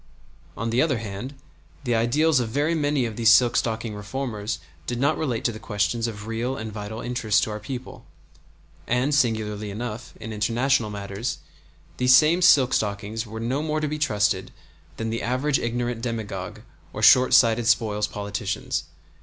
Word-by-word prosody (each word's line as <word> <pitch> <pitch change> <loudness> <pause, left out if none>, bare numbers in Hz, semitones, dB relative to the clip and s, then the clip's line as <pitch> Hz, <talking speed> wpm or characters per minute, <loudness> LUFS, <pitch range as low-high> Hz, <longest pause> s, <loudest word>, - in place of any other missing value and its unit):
On 115 0 -2
the 120 +3 +3
other 150 -6 +2
hand, 110 +5 -6 0.5
the 120 -3 0
ideals 135 +7 +3
of 120 -2 -2
very 145 +7 0
many 145 -4 +1
of 110 -2 -5
the 115 - -3
silk 120 +2 +6
stocking 110 -1 -1
reformers 105 0 -4 0.3
did 120 -1 -2
not 145 +4 +2
relate 125 -8 -2
to 120 - +1
the 110 - -9
questions 110 +3 -1
of 105 -2 -7
real 115 +4 -2
and 110 -1 -6
vital 105 +1 -6
interest 110 -4 +1
to 110 - -2
our 105 - -4
people; 125 +4 -7 0.8
and, 125 +4 +1
singularly 110 -6 0
enough, 110 +2 -6
in 110 0 -6
international 115 +3 +1
matters, 100 +3 -4 0.6
these 125 0 +6
same 155 +6 +5
silk 135 -7 +5
stockings 105 +2 -2
were 110 +1 -7
no 125 +5 -1
more 155 0 -1
to 155 - -1
be 150 +1 -4
trusted 105 -8 +1 0.5
than 115 0 -3
the 115 - -2
average 130 +4 0
ignorant 120 0 -2
demagogue 110 -3 -5 0.3
or 105 - -5
shortsighted 120 -2 +6
spoils 105 -2 +2
politicians. 100 -1 -3
115 Hz, 165 wpm, -24 LUFS, 105-130 Hz, 0.8 s, silk